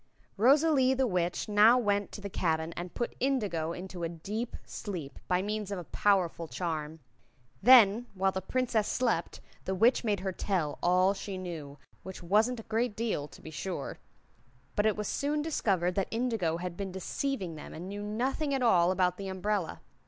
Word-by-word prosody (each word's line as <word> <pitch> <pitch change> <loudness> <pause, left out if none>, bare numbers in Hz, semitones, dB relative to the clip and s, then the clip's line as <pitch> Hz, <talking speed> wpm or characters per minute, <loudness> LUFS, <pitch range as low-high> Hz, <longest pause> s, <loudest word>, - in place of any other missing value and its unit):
Rosalie 265 +3 +4
the 265 0 +2
Witch 180 -5 -1
now 215 +3 +6
went 205 -4 0
to 205 - -8
the 200 - -4
cabin 160 -2 0
and 175 0 -7
put 240 - -3
Indigo 205 -12 0
into 180 0 -7
a 165 - -1
deep 210 +8 -5
sleep, 165 - -6
by 180 0 +1
means 210 0 -3
of 200 - -3
a 175 - -5
powerful 175 -3 +1
charm. 160 -2 -4 0.6
Then, 235 -1 +7
while 190 0 +2
the 190 - -3
Princess 230 0 0
slept, 230 -9 -1 0.2
the 190 - -1
Witch 230 +8 +4
made 205 -4 0
her 190 0 -2
tell 175 -5 -2
all 185 +2 +4
she 195 -1 -6
knew, 160 -6 -7 0.2
which 190 -1 -9
wasn't 220 +7 +2
a - - -8
great 225 0 -1
deal, 215 -10 -2
to - - -16
be 160 - -8
sure; 165 -2 -5 0.8
but 205 +1 +3
it 215 - +2
was 210 -1 -2
soon 295 +1 -1
discovered 190 - +1
that 195 +1 0
Indigo 225 -9 0
had 175 0 -5
been 195 0 -4
deceiving 190 +1 -3
them 155 - -9
and 170 +3 -7
knew 205 +1 -5
nothing 260 +7 -1
at 265 - 0
all 175 -7 +5
about 180 -1 +1
the 195 - -5
umbrella. 190 -1 -2
195 Hz, 180 wpm, -30 LUFS, 175-225 Hz, 0.8 s, Then